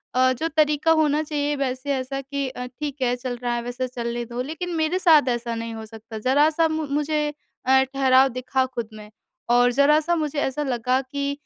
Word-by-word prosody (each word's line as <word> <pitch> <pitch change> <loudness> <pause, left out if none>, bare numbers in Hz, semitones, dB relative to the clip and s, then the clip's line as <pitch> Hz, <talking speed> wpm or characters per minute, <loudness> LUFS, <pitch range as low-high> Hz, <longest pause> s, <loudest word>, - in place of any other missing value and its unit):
अ, 255 0 +4
जो 315 +6 -2
तरीक़ा 305 0 +2
होना 305 -2 +3
चाहिए 295 -1 -1
वैसे 275 0 -2
ऐसा 265 +1 -3
कि 280 0 -3
अ, 250 -1 -6
ठीक 280 +2 -6
है 245 -1 +2
चल 250 0 -5
रहा 240 -1 0
है 240 - -2
वैसे 245 +2 -4
चलने 240 -1 -4
दो। 240 +1 -5
लेकिन 320 +7 -5
मेरे 320 +3 0
साथ 315 -7 +5
ऐसा 235 -1 -2
नहीं 230 0 -5
हो 220 0 -7
सकता 220 0 -10
ज़रा 275 +7 +3
सा 325 +1 +2
मु 315 -1 -2
मुझे 300 0 0 0.4
अ, 265 +1 +5
ठहराव 265 0 +4
दिखा 255 +1 -1
खुद 240 -4 -5
में 210 -1 -11 0.4
और 245 +1 +4
ज़रा 280 +4 +4
सा 340 +3 0
मुझे 305 -3 -2
ऐसा 285 +1 -1
लगा 255 -1 0
कि 280 +2 -3
265 Hz, 210 wpm, -23 LUFS, 245-295 Hz, 0.4 s, साथ